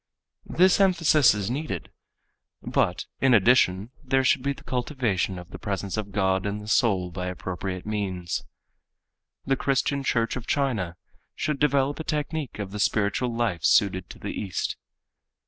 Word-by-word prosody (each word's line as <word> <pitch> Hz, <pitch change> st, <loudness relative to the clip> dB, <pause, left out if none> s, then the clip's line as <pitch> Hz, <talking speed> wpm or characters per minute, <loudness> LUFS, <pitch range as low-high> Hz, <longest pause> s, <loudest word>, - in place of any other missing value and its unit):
This 185 Hz, +2 st, +4 dB
emphasis 165 Hz, -, +5 dB
is 105 Hz, +2 st, -2 dB
needed, 135 Hz, -, -4 dB, 0.7 s
but -, -, 0 dB
in 135 Hz, -2 st, +5 dB
addition 105 Hz, -1 st, +3 dB
there 135 Hz, 0 st, +2 dB
should 130 Hz, -, +3 dB
be 140 Hz, +2 st, 0 dB
the -, -, -15 dB
cultivation 120 Hz, -, -1 dB
of 90 Hz, 0 st, -10 dB
the -, -, -8 dB
presence 100 Hz, -1 st, -3 dB
of 105 Hz, -2 st, -4 dB
God 95 Hz, 0 st, +1 dB
in 100 Hz, +1 st, -2 dB
the 105 Hz, 0 st, -9 dB
soul 100 Hz, -5 st, +2 dB
by 90 Hz, +1 st, -4 dB
appropriate 90 Hz, 0 st, -5 dB
means. 95 Hz, -5 st, -3 dB, 1.0 s
The 135 Hz, -, +2 dB
Christian 140 Hz, +1 st, 0 dB
Church 115 Hz, -3 st, 0 dB
of 130 Hz, -1 st, -6 dB
China 110 Hz, -12 st, -1 dB, 0.4 s
should 150 Hz, -3 st, -2 dB
develop 140 Hz, 0 st, +2 dB
a -, -, -3 dB
technique 155 Hz, -2 st, -3 dB
of 100 Hz, -2 st, -5 dB
the 105 Hz, -, -5 dB
spiritual 110 Hz, +4 st, +1 dB
life 115 Hz, -9 st, -1 dB
suited 95 Hz, -5 st, +3 dB
to -, -, -10 dB
the -, -, -5 dB
East. 95 Hz, -5 st, -3 dB
110 Hz, 155 wpm, -26 LUFS, 95-135 Hz, 1.0 s, emphasis